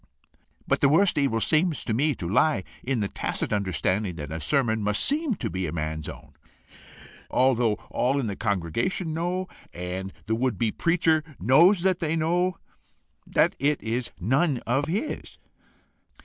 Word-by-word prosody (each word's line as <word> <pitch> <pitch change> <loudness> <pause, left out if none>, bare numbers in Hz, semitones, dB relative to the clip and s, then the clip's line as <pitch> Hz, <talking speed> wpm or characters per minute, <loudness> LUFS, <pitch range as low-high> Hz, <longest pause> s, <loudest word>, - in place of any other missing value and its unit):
But - - +1
the 140 - +5
worse 185 +6 +4
evil 140 -6 +1
appears 155 +6 +1
to 115 - -2
me 145 +5 +1
to 85 - -5
lie 105 - +2 0.2
in 130 -3 -1
the 100 - 0
tacit - - -3
understanding 95 -1 0
that 75 -2 -7
a 80 - -4
sermon 110 - +1
must 105 0 +1
SEEM 295 -4 +1
to - - -3
be 95 0 -3
a - - -4
man's 80 -1 -3
own, 75 - -11 1.0
although 120 -4 +3 0.2
all 135 +3 +1
in 135 - -1
the 100 -3 -3
congregation 115 - -1
know, 180 +3 -2 0.2
and 90 +2 -5
the 110 - -1
would 120 -2 0
be 110 +2 +1
preacher 165 -2 +2 0.2
knows 170 - +5
that 190 -1 +2
they 165 -1 0
know, 175 +3 +1 0.7
that - - +2
it 145 +2 +1
is 115 +2 -2
none 135 - +2
of 135 +5 +1
his." 205 - -3
125 Hz, 165 wpm, -26 LUFS, 100-160 Hz, 1.0 s, the